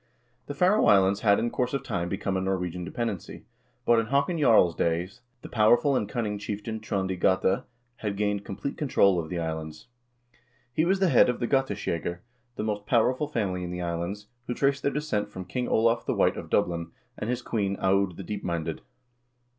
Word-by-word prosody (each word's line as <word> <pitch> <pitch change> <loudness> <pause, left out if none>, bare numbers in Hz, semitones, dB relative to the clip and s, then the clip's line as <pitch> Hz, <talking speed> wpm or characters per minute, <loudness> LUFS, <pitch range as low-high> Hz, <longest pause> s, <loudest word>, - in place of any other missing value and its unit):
The 145 - -5
Faroe 185 +7 +4
Islands 100 0 +5
had 100 -2 +4
in 120 - -1
course 125 +2 -1
of 140 - -2
time 85 +1 -2
become 100 0 -2
a 95 - 0
Norwegian 90 -2 -2
dependency, 105 -1 -4 0.4
but 120 -1 +5
in 115 - -1
Haakon 140 +6 +1
Jarl's 110 - +5
days 85 +4 -1 0.2
the - - -7
powerful 120 +6 +4
and 105 - -1
cunning 110 -5 -2
chieftain 105 +2 -4
Trond 100 -3 -2
i - - 0
Gata 95 +1 +1 0.3
had 105 -3 -3
gained 105 -1 0
complete 100 - -5
control 100 - +3
of 80 -2 -5
the 90 - -3
islands. 80 +2 -5 0.8
He 155 - +2
was 190 +2 +2
the 190 -2 +3
head - - +6
of 125 - -1
the 120 - -1
Gateskjegger, 100 - -1 0.4
the - - -3
most 105 -1 -3
powerful 130 +4 +2
family 100 -10 -2
in 90 - -4
the 90 0 -4
islands, 85 +4 -3 0.2
who 120 - -2
traced 140 0 +1
their 140 - +1
descent 140 -9 -2
from 95 -3 -7
King 125 +4 -3
Olav 115 +1 +2
the - - +1
White - - +3
of - - -7
Dublin, 85 -1 0 0.3
and 105 - -4
his 125 0 -2
queen, 100 -5 -1
Aud 95 -2 +1
the 95 - -6
Deepminded. 85 -5 -3
105 Hz, 195 wpm, -27 LUFS, 90-120 Hz, 0.8 s, head